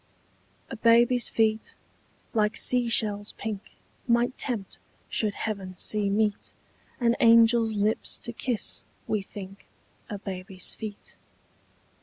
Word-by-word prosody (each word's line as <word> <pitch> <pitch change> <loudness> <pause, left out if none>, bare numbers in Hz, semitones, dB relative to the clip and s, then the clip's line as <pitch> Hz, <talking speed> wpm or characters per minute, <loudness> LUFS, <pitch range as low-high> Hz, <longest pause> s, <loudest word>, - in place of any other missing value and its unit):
A - - -4
BABY'S 235 +2 +4
feet, 220 -1 0 0.6
like 210 -1 +1
sea 245 -2 +4
shells 205 -2 0
pink, 215 -2 -7 0.3
Might 240 +2 +1
tempt, 225 -8 -3 0.3
should 210 -2 0
heaven 195 -4 -5
see 210 +1 +1
meet, 210 0 -1 0.5
An 235 -2 +2
angel's 230 -1 +4
lips 210 +2 0
to 235 - -4
kiss, 240 -1 -1 0.2
we 215 -2 -1
think, 195 0 -11 0.4
A 205 - -5
baby's 185 -1 +1
feet. 210 -2 -9
215 Hz, 115 wpm, -26 LUFS, 205-230 Hz, 0.6 s, BABY'S